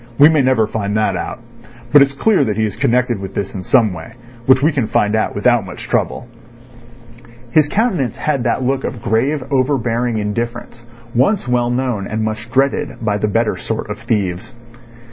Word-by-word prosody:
We 145 +2 +8
may 155 -3 +3
never 130 -4 +3
find 105 -1 -2
that 105 -3 +1
out. 105 - -5 0.5
But 145 - +8
it's 140 0 +3
clear 195 +3 +2
that 105 -2 -2
he 110 - +2
is 105 - -4
connected 120 -2 +1
with 95 0 -7
this 100 -1 -3
in 95 - -5
some 110 0 +3
way, 80 -2 -9 0.3
which 130 +1 +5
we 155 - +4
can 135 -7 -1
find 105 +1 +1
out 110 - -1
without 120 +2 +2
much 95 - -9
trouble." 120 - -1 1.2
His 150 0 +3
countenance 190 - 0
had 140 -5 -1
that 120 +2 0
look 135 +1 0
of 115 - -5
grave, 130 +7 0
overbearing 125 -4 0
indifference 120 +3 -4 0.3
once 135 - +1
well 120 -1 +1
known 120 -5 -1
and 110 0 -2
much 110 +1 -4
dreaded 135 +2 +1
by 105 -1 +1
the 105 - 0
better 115 +2 0
sort - - -4
of - - -6
thieves. 100 +2 -2
120 Hz, 185 wpm, -17 LUFS, 105-135 Hz, 1.2 s, We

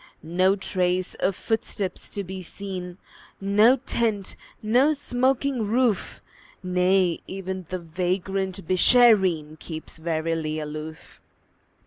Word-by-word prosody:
No 185 +4 +2
trace 185 -2 -1
of 190 0 +1
footsteps 205 -4 -3
to 200 - -4
be 190 0 -7
seen, 180 -1 -7 0.4
No 210 +5 +5
tent, 225 -6 -1 0.3
no 250 +8 +4
smoking 260 -3 0
roof; 235 -1 0 0.4
Nay, 180 -1 +2
even 190 -2 -5
the 185 - -2
vagrant 185 +2 -2
Beeshareen 185 -6 +4
Keeps 160 0 -7
warily 160 -1 -1
aloof. 155 +1 -8
190 Hz, 100 wpm, -25 LUFS, 175-210 Hz, 0.4 s, No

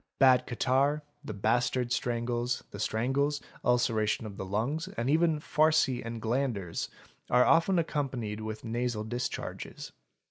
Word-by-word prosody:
Bad 130 -2 +5
catarrh, 135 +5 +1 0.2
the 110 -7 -6
bastard 120 +4 +1
strangles, 120 0 -1
the 100 - -8
strangles, 135 +8 0 0.2
ulceration 115 -3 +2
of 105 -2 -7
the 95 - -5
lungs, 120 - -1
and 135 -9 -2
even 160 0 +3
farcy 150 -5 +2
and 115 0 -5
glanders, 110 -7 -1 0.4
are 125 +1 +5
often 170 +3 +4
accompanied 130 -10 -2
with 110 +1 -6
nasal 120 -1 -1
discharges. 120 +3 -5
125 Hz, 130 wpm, -30 LUFS, 110-140 Hz, 0.4 s, Bad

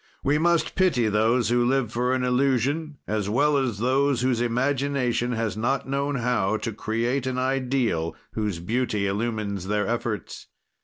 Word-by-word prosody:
"We 145 +2 +2
must 170 0 +2
pity 150 - +2
those 110 +3 +2
who 120 0 +3
live 125 -2 +1
for 125 +2 0
an 130 - -1
illusion 135 +4 +1
as 105 -2 -2
well 145 +7 +3
as 130 -6 0
those 130 +3 +1
whose 125 -2 +1
imagination 125 0 0
has 115 -4 -2
not 130 +6 -1
known 140 +1 -1
how 115 -5 +1
to 115 0 -4
create 120 +5 -1
an 130 -1 -2
ideal, 130 -10 0 0.2
whose 105 -5 -2
beauty 110 +3 -1
illumines 100 -2 -2
their 105 0 0
efforts. 115 -1 -3
120 Hz, 155 wpm, -25 LUFS, 110-135 Hz, 0.2 s, who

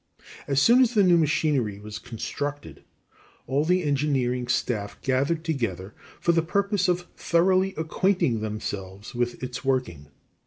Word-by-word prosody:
As 140 -1 +2
soon 240 - +6
as 245 -2 +2
the 205 - +5
new 180 -2 +5
machinery 145 -9 +1
was 105 0 -8
constructed, 145 +5 -6 0.6
all 140 +3 +1
the 180 +3 +2
engineering 135 -4 0
staff 110 -4 -2
gathered 140 +5 0
together 110 - -3 0.3
for 170 - +2
the 165 -1 +3
purpose 200 +3 0
of 180 0 0
thoroughly 185 +3 +2
acquainting 160 - +1
themselves 105 -2 -5
with 120 +1 -2
its 125 -1 -5
working. 125 - -1
140 Hz, 140 wpm, -25 LUFS, 115-170 Hz, 0.6 s, soon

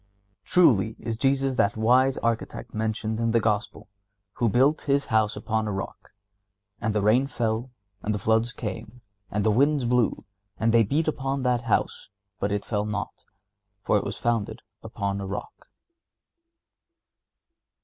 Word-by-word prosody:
Truly 110 - +4
is 115 - -4
Jesus 135 +2 +1
that 100 -2 +2
wise 130 +4 +3
Architect 115 0 -2
mentioned 110 0 -2
in 115 0 +1
the 115 +1 +3
Gospel, 105 -2 -2 0.5
"who 120 - +2
built 135 +8 +3
his 140 0 +2
house 110 -1 +3
upon 110 +1 -2
a - - -2
rock; 95 0 -6 0.7
and 110 -2 -1
the 105 - +1
rain 120 +6 +4
fell, 115 -1 -2 0.3
and 105 - -2
the 105 - 0
floods 110 +3 +1
came, 110 +2 -7 0.3
and 105 0 -1
the 110 - +4
winds 140 +3 +2
blew, 120 -2 +1 0.4
and 115 0 +2
they 115 - +6
beat 145 +10 +1
upon 135 -2 -1
that 125 -2 +1
house, 115 - -1 0.3
and 100 - 0
it 105 0 -2
fell 105 -1 -1
not, 105 -2 -5 0.6
for - - +2
it - - +2
was - - -5
founded 115 -3 -1 0.2
upon 100 0 -3
a 95 - -5
rock." 100 +2 -7
115 Hz, 155 wpm, -26 LUFS, 105-125 Hz, 0.7 s, they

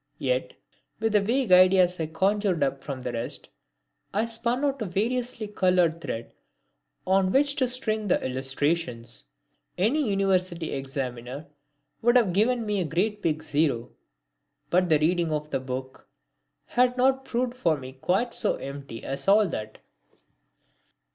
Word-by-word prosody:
Yet, - - -1 0.5
with 225 0 0
the 210 - +5
vague 235 +1 0
ideas 180 -1 +6
I 160 - -1
conjured 190 0 +1
up 135 0 -2
from 135 -3 -6
the 125 - -3
rest, 115 +1 -4 0.7
I 215 +2 +2
spun 235 +4 -1
out 275 -3 -1
a - - -1
variously 235 +4 -1
coloured 180 -5 +2
thread 115 -7 -5 0.7
on 190 0 +3
which 280 +3 +3
to 260 - +2
string 220 -4 0
the 180 - +3
illustrations. 130 -2 -2 0.5
Any 245 +7 +1
university 185 -4 0
examiner 135 0 -5 0.6
would 240 +1 +3
have 210 -8 +2
given 230 +4 +2
me 205 -2 0
a - - -1
great 205 +7 -1
big 160 -3 -1
zero, 145 -6 0 0.8
but 180 0 +3
the 155 - +5
reading 165 +2 +1
of 150 0 -3
the - - 0
book 130 0 -7 0.6
had 250 0 +2
not 265 +1 +3
proved 245 -1 -1
for 170 -11 +1
me 130 -1 -9
quite 190 - 0
so - - +1
empty 140 -4 -8
as 135 +5 -4
all 205 +1 +5
that. 110 -6 -6
185 Hz, 150 wpm, -26 LUFS, 145-225 Hz, 0.8 s, ideas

